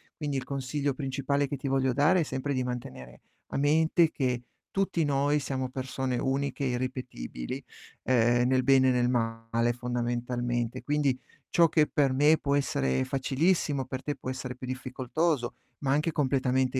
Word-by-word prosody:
Quindi 145 Hz, -3 st, -2 dB
il 130 Hz, -, -2 dB
consiglio 140 Hz, +2 st, -2 dB
principale 140 Hz, +1 st, -1 dB
che 140 Hz, 0 st, -4 dB
ti 140 Hz, -, -5 dB
voglio 130 Hz, -1 st, +2 dB
dare 155 Hz, +7 st, +4 dB
è -, -, +3 dB
sempre 140 Hz, 0 st, -3 dB
di 130 Hz, -, 0 dB
mantenere 65 Hz, -, -6 dB, 0.3 s
a -, -, -4 dB
mente 160 Hz, +3 st, +3 dB
che 125 Hz, -4 st, -1 dB, 0.3 s
tutti 195 Hz, -4 st, 0 dB
noi 145 Hz, +1 st, +2 dB
siamo 130 Hz, -2 st, -3 dB
persone 130 Hz, -1 st, -3 dB
uniche 140 Hz, +2 st, -1 dB
e -, -, +1 dB
irripetibili, 125 Hz, -, -4 dB, 0.4 s
uhm, 120 Hz, -1 st, +3 dB
nel 130 Hz, 0 st, +2 dB
bene 130 Hz, 0 st, +5 dB
e -, -, +4 dB
nel 125 Hz, -1 st, +2 dB
male 115 Hz, 0 st, 0 dB
fondamentalmente. 120 Hz, -1 st, -2 dB
Quindi 145 Hz, -3 st, +1 dB, 0.3 s
ciò 170 Hz, -2 st, +5 dB
che 155 Hz, -1 st, +3 dB
per 140 Hz, -3 st, +2 dB
me 150 Hz, +4 st, +5 dB
può 140 Hz, -2 st, 0 dB
essere 140 Hz, -2 st, +1 dB
facilissimo, 140 Hz, +2 st, +1 dB
per 130 Hz, +1 st, -6 dB
te 145 Hz, -, -2 dB
può 130 Hz, -, -6 dB
essere 130 Hz, -1 st, -5 dB
più 130 Hz, -, -7 dB
difficoltoso, 130 Hz, +2 st, -1 dB, 0.2 s
ma 135 Hz, -2 st, 0 dB
anche 150 Hz, +4 st, +2 dB
completamente 130 Hz, -2 st, +1 dB
130 Hz, 165 wpm, -28 LUFS, 125-145 Hz, 0.4 s, bene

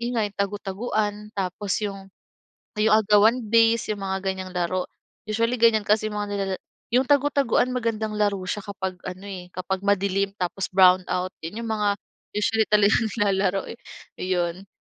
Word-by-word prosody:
'yon 240 Hz, +1 st, -2 dB
nga 225 Hz, -, +2 dB
yung 205 Hz, -, -11 dB
tagu-taguan 205 Hz, +1 st, -1 dB, 0.2 s
tapos 195 Hz, +1 st, -2 dB
yung 195 Hz, -1 st, -6 dB, 0.7 s
yung 215 Hz, 0 st, +4 dB
agawan 220 Hz, +3 st, +4 dB
base, 230 Hz, 0 st, +3 dB
yung 205 Hz, -, -9 dB
mga 190 Hz, 0 st, -1 dB
ganyang 190 Hz, -1 st, -3 dB
laro. 180 Hz, +1 st, 0 dB, 0.4 s
Usually, 230 Hz, +3 st, +1 dB
ganyan 230 Hz, -2 st, +5 dB
kasi 215 Hz, +1 st, +2 dB
mga 210 Hz, 0 st, -2 dB
nilala 195 Hz, -1 st, -1 dB, 0.4 s
yung 255 Hz, +2 st, +4 dB
tagu-taguan 280 Hz, -3 st, +3 dB
magandang 220 Hz, -3 st, -2 dB
laro 205 Hz, -1 st, +2 dB
siya 210 Hz, -, -2 dB
kapag 190 Hz, -2 st, -4 dB
ano, 185 Hz, +2 st, -7 dB
eh, 180 Hz, -3 st, -7 dB
kapag 185 Hz, +1 st, -3 dB
madilim 200 Hz, 0 st, +1 dB
tapos 185 Hz, +1 st, -2 dB
brown 185 Hz, -1 st, +6 dB
out. 185 Hz, +1 st, -1 dB
'Yon 195 Hz, +8 st, -5 dB
yung -, -, -4 dB
mga 205 Hz, -1 st, +1 dB, 0.4 s
usually 220 Hz, +1 st, +2 dB
talagang 210 Hz, +2 st, +4 dB
nilalaro, 195 Hz, -2 st, +1 dB
eh. 235 Hz, -, -9 dB, 0.4 s
Ayon. 180 Hz, +1 st, -1 dB
200 Hz, 160 wpm, -24 LUFS, 190-220 Hz, 0.7 s, brown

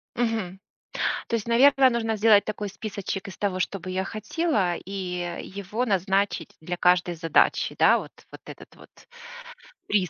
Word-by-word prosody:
Мгм. 220 Hz, -6 st, -2 dB, 0.7 s
То 230 Hz, -, 0 dB
есть, 230 Hz, 0 st, -4 dB
наверно, 265 Hz, +3 st, +5 dB
нужно 225 Hz, -2 st, -1 dB
сделать 210 Hz, -1 st, +5 dB
такой 210 Hz, -1 st, -4 dB
списочек 195 Hz, -2 st, -5 dB
из 195 Hz, -, -9 dB
того, 190 Hz, -3 st, -1 dB
что 195 Hz, +1 st, -2 dB
бы 185 Hz, -, -8 dB
я 185 Hz, +1 st, -1 dB
хотела, 215 Hz, -, -1 dB
и 180 Hz, -2 st, -5 dB
его 200 Hz, +5 st, -4 dB
назначить 195 Hz, -3 st, 0 dB
для 175 Hz, +2 st, -4 dB
каждой 180 Hz, 0 st, +2 dB
задачи, 165 Hz, -1 st, +2 dB
да? -, -, +5 dB
Вот -, -, -7 dB, 0.2 s
вот -, -, -12 dB
этот -, -, -12 dB
вот -, -, -17 dB, 1.0 s
приз 190 Hz, -5 st, +1 dB
195 Hz, 155 wpm, -25 LUFS, 180-220 Hz, 1.0 s, наверно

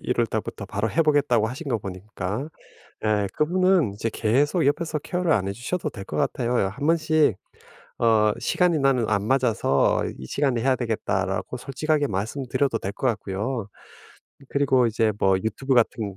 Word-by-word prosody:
1 125 Hz, -, -1 dB
월 120 Hz, -, +3 dB
달부터 110 Hz, -2 st, -4 dB
바로 105 Hz, +3 st, -2 dB
해 165 Hz, -, +2 dB
보겠다고 145 Hz, -7 st, +2 dB
하신 135 Hz, +6 st, -6 dB
거 115 Hz, -, 0 dB
보니까. 100 Hz, -, -5 dB, 0.5 s
네. 105 Hz, -2 st, +1 dB
그분은 175 Hz, -, +2 dB
이제 105 Hz, +3 st, -2 dB
계속 140 Hz, -, +1 dB
옆에서 155 Hz, +2 st, 0 dB
케어를 175 Hz, +2 st, 0 dB
안 95 Hz, -8 st, +1 dB
해 100 Hz, -, -2 dB
주셔도 150 Hz, -, -3 dB
될 100 Hz, -5 st, -8 dB
것 75 Hz, -, -6 dB
같아요. 120 Hz, -, 0 dB
어 100 Hz, -5 st, +2 dB
한번씩 155 Hz, -, +2 dB, 0.6 s
어 110 Hz, -2 st, +4 dB
"시간이 175 Hz, -3 st, +1 dB
나는 135 Hz, -5 st, +2 dB
안 100 Hz, -2 st, +1 dB
맞아서 115 Hz, -, +2 dB
이 65 Hz, -, -8 dB
시간에 130 Hz, -, 0 dB
해야 130 Hz, -1 st, +2 dB
되겠다."라고 105 Hz, -2 st, -2 dB
솔직하게 145 Hz, +3 st, -1 dB
말씀드려도 115 Hz, +5 st, -1 dB
될 100 Hz, -, -4 dB
것 130 Hz, -, -3 dB
같고요. 105 Hz, +1 st, -3 dB, 0.8 s
그리고 135 Hz, -3 st, +3 dB
이제 110 Hz, -1 st, +1 dB
뭐 95 Hz, -, +3 dB
YouTube 110 Hz, +8 st, 0 dB
같은 110 Hz, -4 st, +1 dB
120 Hz, 355 characters per minute, -24 LUFS, 105-145 Hz, 0.8 s, 어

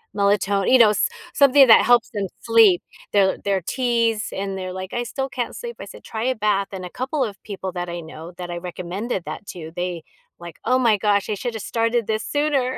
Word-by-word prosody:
melaton 200 Hz, -1 st, +1 dB
you 260 Hz, -, +8 dB
know, 220 Hz, -3 st, +6 dB
s 215 Hz, -, +1 dB, 0.2 s
something 280 Hz, -1 st, +6 dB
that 225 Hz, -, +8 dB
helps 240 Hz, -1 st, +3 dB
them 200 Hz, -2 st, -2 dB, 0.2 s
sleep. 225 Hz, -6 st, +5 dB, 0.3 s
Their 195 Hz, -2 st, +4 dB
their 195 Hz, -1 st, -1 dB
teas, 230 Hz, +1 st, 0 dB
and 195 Hz, 0 st, -4 dB
they're 185 Hz, -1 st, -5 dB
like, 185 Hz, 0 st, -7 dB
"I 240 Hz, -, -1 dB
still 270 Hz, +3 st, -3 dB
can't 245 Hz, -3 st, -4 dB
sleep." 475 Hz, -1 st, -7 dB
I -, -, -7 dB
said, -, -, -13 dB
"Try 220 Hz, +1 st, -4 dB
a 260 Hz, 0 st, +1 dB
bath." 205 Hz, -2 st, +1 dB
And 185 Hz, -2 st, -6 dB
a -, -, -7 dB
couple 270 Hz, +2 st, -2 dB
of 205 Hz, -4 st, -6 dB
people 190 Hz, -3 st, -6 dB
that 175 Hz, 0 st, -5 dB
I 170 Hz, 0 st, -4 dB
know 160 Hz, +1 st, -10 dB
that 175 Hz, -1 st, -6 dB
I 175 Hz, -, -4 dB
recommended 185 Hz, +3 st, -4 dB
that 200 Hz, -, -7 dB
to, 160 Hz, -2 st, -8 dB
they, 175 Hz, -2 st, -3 dB, 0.3 s
like, 170 Hz, -2 st, -11 dB
"Oh 255 Hz, +2 st, +3 dB
my 230 Hz, -5 st, +3 dB
gosh, 205 Hz, 0 st, +1 dB
I -, -, +1 dB
should 230 Hz, +3 st, -4 dB
have 220 Hz, -, -5 dB
started 230 Hz, 0 st, 0 dB
this 215 Hz, +1 st, -1 dB
sooner." 285 Hz, -3 st, 0 dB
210 Hz, 225 wpm, -22 LUFS, 185-240 Hz, 0.3 s, you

